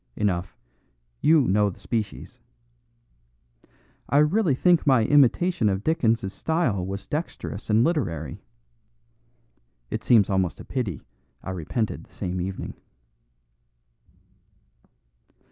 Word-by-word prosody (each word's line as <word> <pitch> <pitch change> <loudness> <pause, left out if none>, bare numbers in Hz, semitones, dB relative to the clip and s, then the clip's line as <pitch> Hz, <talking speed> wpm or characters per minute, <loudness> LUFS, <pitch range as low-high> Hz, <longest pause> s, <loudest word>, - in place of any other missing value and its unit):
Enough, 95 -2 -2 0.6
you 155 0 +5
know 105 -3 +2
the 95 - -11
species. 115 +2 -4 1.7
I 140 - +3
really 155 +1 +3
think 175 +2 +3
my 130 -5 +5
imitation 145 - +3
of 95 +1 -2
Dickens's 115 -10 +1
style 160 - 0
was 100 +2 -5
dexterous 150 - -5
and 110 +2 +4
literary. 85 - -2 1.5
It - - -3
seems 110 -5 +5
almost 95 -3 0
a - - -10
pity 115 - -3 0.4
I - - -5
repented 95 - -3
the - - -28
same 90 -2 -3
evening." 95 +1 -5
110 Hz, 105 wpm, -25 LUFS, 95-145 Hz, 1.7 s, you